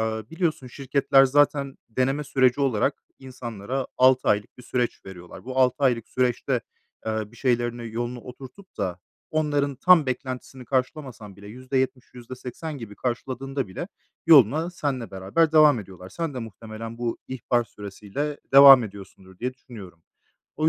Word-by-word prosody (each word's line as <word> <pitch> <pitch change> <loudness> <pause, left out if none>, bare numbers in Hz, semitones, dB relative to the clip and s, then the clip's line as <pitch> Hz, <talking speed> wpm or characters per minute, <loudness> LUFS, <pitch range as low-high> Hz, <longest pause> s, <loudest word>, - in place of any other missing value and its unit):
ııı, 110 -1 -3
biliyorsun 160 -5 -2
şirketler 135 +1 +3
zaten 140 0 +2
deneme 135 +5 0
süreci 130 0 +2
olarak 135 0 0 0.2
insanlara 125 -1 -5
6 130 0 +4
aylık 105 +3 0
bir - - -11
süreç 125 0 -2
veriyorlar. 90 +1 -11
Bu 130 +1 -4
6 125 -1 +4
aylık 120 -3 +1
süreçte, 125 -2 0 0.5
ııı, 110 0 -3
bir - - -16
şeylerini 120 -2 -1
yolunu 120 +1 -4
oturtup 130 +10 -13
da 90 -2 -2 0.3
onların 145 -3 0
tam 175 -3 +5
beklentisini 130 0 -5
karşılamasan 130 - -3
bile 100 0 -13
%70, 130 +1 -2
%80 130 +5 -8
gibi 105 -3 -9
karşıladığında 130 0 -3
bile 95 - -6 0.4
yoluna 155 - +6
senle 135 - -3
beraber 100 - 0
devam 150 -5 +6
ediyorlar. 95 -1 -12
Sen 160 - -4
de - - -4
muhtemelen 115 +1 -8
bu 120 -1 -2
ihbar 120 -2 0
süresiyle 105 +9 -6
devam 135 -3 +10
ediyorsundur, 95 -2 -12
diye 125 +2 -3
düşünüyorum. 100 -10 -13 0.5
O 155 +1 +2
125 Hz, 140 wpm, -25 LUFS, 110-135 Hz, 0.5 s, devam